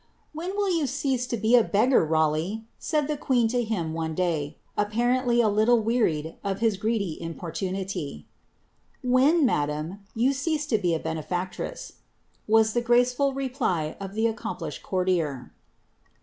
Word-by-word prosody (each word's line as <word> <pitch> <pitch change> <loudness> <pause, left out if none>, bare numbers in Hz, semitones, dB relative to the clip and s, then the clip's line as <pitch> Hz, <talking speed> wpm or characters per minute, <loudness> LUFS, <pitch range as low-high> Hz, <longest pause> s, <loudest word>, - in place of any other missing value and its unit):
irill 375 +2 -1
yon 290 - 0
cease 260 -1 -1
to 235 - -2
be 220 +3 +3
a 240 - +6
beggar, 220 +4 +3
Raleigh 160 +6 0
?" - - -42
said 300 -3 0
the 300 - -1
queen 250 -5 +2
to 245 +1 +1
y, 160 -4 -1 0.2
apparently 240 +3 +2
a 225 - +3
little 220 +2 +3
weari^ 165 -10 0
of 195 -1 -1
his 225 -2 +2
greedy 200 -5 -1
importunity, 170 - -4 0.8
madam, 245 - +2 0.2
yon 250 +5 +3
cease 300 +2 -1
to 230 -7 +1
be 175 -4 +1
a - - -2
benefactress,*' 175 - -4 0.5
was 220 0 +4
the 240 - +1
graceful 245 +3 +3
B 220 - -2
accomplished 220 -9 -3
courtier. 175 -8 -1
220 Hz, 130 wpm, -26 LUFS, 170-250 Hz, 0.8 s, a